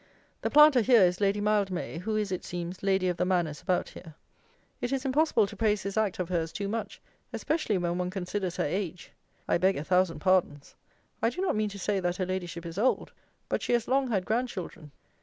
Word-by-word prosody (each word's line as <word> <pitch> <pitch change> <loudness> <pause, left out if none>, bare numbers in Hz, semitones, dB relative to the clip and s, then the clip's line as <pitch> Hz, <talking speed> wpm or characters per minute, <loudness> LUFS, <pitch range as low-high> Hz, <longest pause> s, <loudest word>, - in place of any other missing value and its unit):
The - - -1
planter 300 -4 +7
here 235 -2 +6
is 180 +1 +2
LADY 200 +1 +2
MILDMAY, 200 -5 0
who 215 +4 -2
is, 210 -2 -1
it 185 - -3
seems, 175 +1 -6
Lady 190 -1 +1
of 180 -1 -1
the - - +1
Manors 175 -5 0
about 185 -2 0
here. 160 -4 -12 0.7
It 245 - -2
is 270 0 -1
impossible 270 -5 +3
to - - -9
praise 210 -3 +1
this 195 0 -4
act 215 -4 0
of 180 - -2
hers 165 -3 -1
too 200 - -4
much, 215 0 -4 0.3
especially 300 - -1
when 175 0 -1
one 180 0 -1
considers 185 -1 -3
her - - 0
age. 180 +1 -4 0.4
I - - +2
beg 190 +2 +2
a 145 - -3
thousand 180 0 +2
pardons! 150 -4 +1 0.5
I 230 - +3
do 245 - -8
not 385 - +1
mean 215 0 0
to 200 - -9
say 200 +1 -1
that 175 -1 -1
her 185 - -1
Ladyship 175 -2 -4
is 170 +3 -5
old; 255 +4 +1 0.4
but - - -1
she - - -1
has 235 -2 +1
long 270 +1 +2
had 195 -5 0
grand 240 +5 0
children. 170 -7 -8
190 Hz, 220 wpm, -28 LUFS, 180-215 Hz, 0.7 s, planter